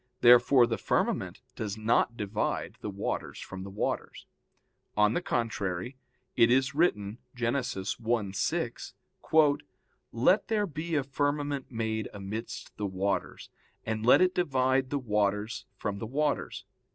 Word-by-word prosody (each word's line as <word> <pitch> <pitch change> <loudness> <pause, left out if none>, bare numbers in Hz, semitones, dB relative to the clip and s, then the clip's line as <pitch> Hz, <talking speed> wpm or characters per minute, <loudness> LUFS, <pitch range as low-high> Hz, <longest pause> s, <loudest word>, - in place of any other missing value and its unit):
Therefore 125 +1 +7
the 115 -1 -2
firmament - - -1
does 105 -1 -4
not 115 +1 +2
divide 105 +1 -2
the - - -4
waters 100 0 -3
from 95 0 -7
the 95 - -7
waters. 100 +2 -3 0.7
On 105 +1 +4
the 175 - 0
contrary, 115 - -2 0.4
It 115 - +5
is 130 +2 +3
written 110 - +1 0.2
(Gen. 120 -1 0
1:6): 120 +6 -1 0.5
"Let 155 - +3
there 215 -2 +1
be 165 -1 -4
a 145 - +2
firmament 145 0 -1
made 110 -2 -2
amidst 100 +3 -6
the 105 - -2
waters; 95 +1 -2 0.3
and 110 0 -2
let 125 +9 +6
it 185 0 +4
divide 130 -5 +1
the 145 - 0
waters 105 -2 -1
from 100 -2 -3
the 110 - -4
waters." 145 +4 -1
115 Hz, 130 wpm, -29 LUFS, 105-140 Hz, 0.7 s, Therefore